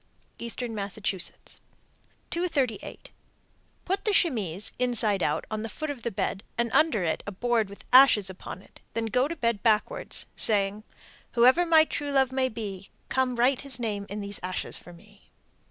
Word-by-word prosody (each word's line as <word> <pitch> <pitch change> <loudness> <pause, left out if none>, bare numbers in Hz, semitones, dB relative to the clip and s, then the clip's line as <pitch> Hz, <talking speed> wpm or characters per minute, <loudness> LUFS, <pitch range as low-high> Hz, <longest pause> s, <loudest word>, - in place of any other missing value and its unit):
Eastern 235 0 -4
Massachusetts. 200 -2 -3 0.7
238. 295 -10 -2 0.7
Put 390 +2 0
the 425 - +1
chemise, 210 - +1
inside 225 -6 +1
out, 150 0 0
on 215 0 -2
the 225 - -4
foot 310 +7 -4
of 270 -4 -8
the 235 - -2
bed 195 -1 -3
and 235 -1 0
under 305 - +3
it 160 -2 -1
a - - -3
board 225 +1 0
with 200 - -12
ashes 255 -7 +7
upon 190 0 -6
it; - - -19 0.2
then 230 0 0
go 250 +4 +2
to 335 - -4
bed 230 -8 0
backwards, 230 - 0
saying, 205 0 +1 0.5
Whoever 255 +9 +5
my 320 -1 +6
true 290 -2 -3
love 265 -2 +3
may 260 0 +1
be, 200 -4 -6 0.2
Come 260 -1 +1
write 250 +2 +2
his 275 -4 -2
name 205 -4 -3
in 205 +1 -5
these 200 0 +1
ashes 185 0 -3
for 175 - -8
me. 205 +4 -18
230 Hz, 170 wpm, -27 LUFS, 200-260 Hz, 0.7 s, ashes